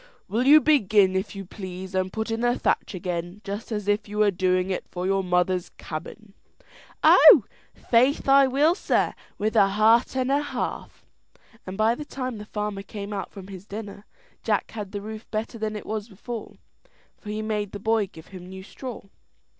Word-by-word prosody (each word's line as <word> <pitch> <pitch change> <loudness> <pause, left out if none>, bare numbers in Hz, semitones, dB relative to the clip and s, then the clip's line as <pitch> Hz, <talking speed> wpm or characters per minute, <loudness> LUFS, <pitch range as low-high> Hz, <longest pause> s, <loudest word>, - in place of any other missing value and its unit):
Will 230 +7 0
you 300 +2 +9
begin, 210 -11 +3
if 190 +2 -2
you 195 0 -6
please, 185 0 -8
and 185 0 0
put 220 +2 -3
in 225 - -1
the 240 0 +2
thatch - - 0
again, 175 +1 -4
just 200 +4 -6
as 210 -2 -3
if 205 +1 +1
you 210 - -6
were 210 -1 +4
doing 185 0 +1
it 185 - -2
for 180 0 -4
your 195 0 +1
mother's 180 0 +1
cabin?" 195 +6 -8 0.7
"Oh, - - +8 0.3
faith 255 +5 +2
I 275 0 +6
will, 285 +6 +3
sir, 370 - 0 0.2
with 215 +1 -1
a 195 - +6
heart 220 +5 +3
and 260 0 0
a 285 +1 +3
half;" 290 - -5 0.6
and 185 +1 -6
by 220 +1 +3
the 270 - -6
time 255 -5 -5
the 210 - -8
farmer 210 -1 -4
came 200 +1 -7
out 195 -2 -4
from 195 -1 -11
his 195 0 -10
dinner, 205 0 -8 0.3
Jack - - -1
had 210 -4 -6
the 205 - -5
roof 215 +1 -8
better 225 +2 -4
than 215 0 -2
it 210 - -7
was 215 0 -4
before, 225 +3 -7 0.6
for 210 - -10
he 215 +1 -3
made 210 -2 -2
the 205 - -7
boy 220 -1 +1
give 160 -4 -15
him 180 -2 -10
new 190 0 -9
straw. 250 +4 -8
210 Hz, 195 wpm, -25 LUFS, 190-225 Hz, 0.7 s, you